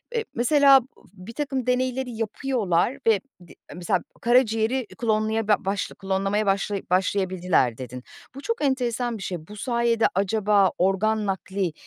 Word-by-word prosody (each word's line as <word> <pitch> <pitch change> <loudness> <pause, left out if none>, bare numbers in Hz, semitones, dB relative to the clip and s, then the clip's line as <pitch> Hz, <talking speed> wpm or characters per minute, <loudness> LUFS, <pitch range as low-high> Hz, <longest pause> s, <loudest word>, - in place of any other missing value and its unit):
eee, 450 - -1
mesela, 275 +2 +5
bu 185 +1 -17
birtakım 265 +1 -3
deneyleri 255 0 0
yapıyorlar 225 -1 -1
ve 220 -3 +5 0.3
di - - -14 0.2
mesela, 180 +1 0 0.2
"Karaciğeri 240 +1 +2
klonlaya 220 -1 0
ba 210 - +5
baş 195 +1 -2
klonlamaya 195 +2 -1
başlaya 200 0 0
başlayabildiler." 185 -1 -1 0.2
dedin. 125 -1 -8 0.3
Bu 275 - -8
çok 460 +4 -3
enteresan 245 -3 0
bir 195 - -8
şey. 170 -4 -5
Bu 210 - -10
sayede, 235 0 +1
acaba, 200 0 +2
organ 210 +4 +1
nakli, 190 -2 -2
215 Hz, 135 wpm, -24 LUFS, 195-245 Hz, 0.3 s, mesela